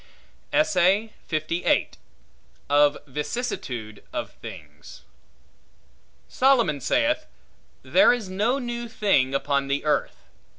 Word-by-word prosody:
Of 165 Hz, -, 0 dB
Vicissitude 130 Hz, -, -5 dB
Of -, -, -4 dB
Things 75 Hz, -5 st, -11 dB, 1.2 s
SOLOMON 235 Hz, -, +2 dB
saith, 305 Hz, -, +1 dB, 0.6 s
There 290 Hz, -, +5 dB
is 240 Hz, -5 st, -2 dB
no 210 Hz, +8 st, 0 dB
new 240 Hz, -2 st, -4 dB
thing 140 Hz, -12 st, +1 dB
upon 140 Hz, 0 st, 0 dB
the 140 Hz, +2 st, -1 dB
earth. 150 Hz, -, -1 dB
170 Hz, 80 wpm, -24 LUFS, -, 1.2 s, There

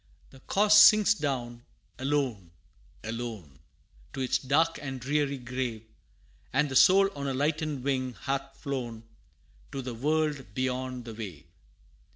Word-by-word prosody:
The 135 Hz, -, -15 dB
corse 210 Hz, +8 st, +4 dB
sinks 210 Hz, -1 st, +7 dB
down, 125 Hz, -, -4 dB, 0.4 s
alone 130 Hz, -9 st, -1 dB, 0.5 s
alone, 110 Hz, -, -6 dB, 0.5 s
To 135 Hz, -, -4 dB
its 130 Hz, -, +1 dB
dark 160 Hz, +5 st, +1 dB
and 135 Hz, -2 st, -5 dB
dreary 140 Hz, +2 st, 0 dB
grave, 125 Hz, -3 st, -4 dB, 0.7 s
And 145 Hz, +3 st, +1 dB
the 130 Hz, -, -5 dB
soul 195 Hz, +6 st, +6 dB
on 140 Hz, -1 st, -4 dB
a 135 Hz, -, -1 dB
lightened 150 Hz, -1 st, -1 dB
wing 130 Hz, -2 st, -1 dB
hath 135 Hz, 0 st, -3 dB
flown, 120 Hz, -6 st, -5 dB, 0.7 s
To 135 Hz, -, -5 dB
the 125 Hz, -1 st, -5 dB
world 145 Hz, -3 st, -1 dB
beyond 130 Hz, -1 st, -2 dB
the 115 Hz, -, -7 dB
wave. 100 Hz, -9 st, -8 dB
130 Hz, 135 wpm, -28 LUFS, 120-145 Hz, 0.7 s, sinks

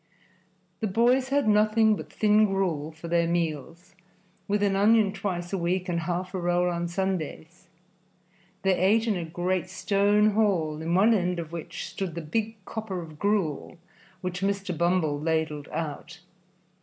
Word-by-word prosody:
The 220 Hz, -, -1 dB
boys 245 Hz, +6 st, +2 dB
had 280 Hz, -3 st, +1 dB
nothing 215 Hz, +1 st, +4 dB
but -, -, -9 dB
thin 215 Hz, 0 st, +4 dB
gruel 175 Hz, -6 st, -1 dB
for 165 Hz, +2 st, -10 dB
their 170 Hz, 0 st, +2 dB
meals, 165 Hz, 0 st, -3 dB, 0.5 s
with 205 Hz, 0 st, +1 dB
an 200 Hz, -1 st, +2 dB
onion 210 Hz, 0 st, +4 dB
twice 185 Hz, -3 st, -4 dB
a 195 Hz, -, 0 dB
week 180 Hz, +2 st, -1 dB
and 170 Hz, -2 st, -1 dB
half 175 Hz, +2 st, -3 dB
a 190 Hz, -, -2 dB
roll 175 Hz, 0 st, +1 dB
on 170 Hz, 0 st, -2 dB
Sundays. 175 Hz, -1 st, -4 dB, 1.0 s
They 195 Hz, -1 st, +3 dB
ate 215 Hz, +5 st, +3 dB
in 220 Hz, -3 st, +1 dB
a 175 Hz, -, -3 dB
great 175 Hz, +2 st, -2 dB
stone 205 Hz, +2 st, +2 dB
hall, 180 Hz, -8 st, +1 dB
in 165 Hz, +2 st, -1 dB
one 210 Hz, +5 st, +5 dB
end 180 Hz, -3 st, 0 dB
of 165 Hz, -2 st, -5 dB
which 170 Hz, -2 st, -6 dB
stood 185 Hz, -4 st, -5 dB
the 170 Hz, -, -4 dB
big 220 Hz, +8 st, -2 dB
copper 215 Hz, -4 st, -5 dB
of 155 Hz, -2 st, -13 dB
gruel 200 Hz, -6 st, -1 dB, 0.4 s
which 180 Hz, 0 st, -4 dB
Mr. 195 Hz, -2 st, -1 dB
Bumble 170 Hz, -3 st, +1 dB
ladled 155 Hz, -2 st, -1 dB
out. 155 Hz, 0 st, -5 dB
185 Hz, 160 wpm, -27 LUFS, 170-205 Hz, 1.0 s, one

